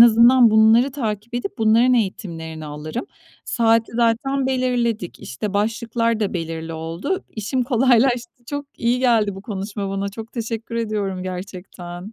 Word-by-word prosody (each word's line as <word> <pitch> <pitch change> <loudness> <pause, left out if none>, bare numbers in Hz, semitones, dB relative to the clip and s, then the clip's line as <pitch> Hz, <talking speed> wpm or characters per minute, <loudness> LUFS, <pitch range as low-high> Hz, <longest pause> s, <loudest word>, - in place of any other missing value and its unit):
azından 235 +1 +7
bunları 220 +5 +5
takip 225 -4 -4
edip 240 -5 -4
bunların 225 +3 +4
eğitimlerini 165 -8 -3
alırım. 150 - -5 0.4
Saati 230 -1 +2
zaten 245 +4 +1
belirledik. 245 -7 -1
İşte, 195 +11 -5
başlıklar 230 +2 0
da 210 - 0
belirli 165 -1 -4
oldu. 165 - -3
İşim 235 +4 -2
kolaylaştı. 245 -1 +2
Çok 285 +1 -4
iyi 240 +2 +1
geldi 230 -6 +2
bu 195 - -9
konuşma 200 -1 -4
bana. 195 0 -2
Çok 220 +3 -9
teşekkür 230 -1 -4
ediyorum, 210 -5 -2
gerçekten. 185 +1 -7
225 Hz, 135 wpm, -21 LUFS, 195-240 Hz, 0.4 s, azından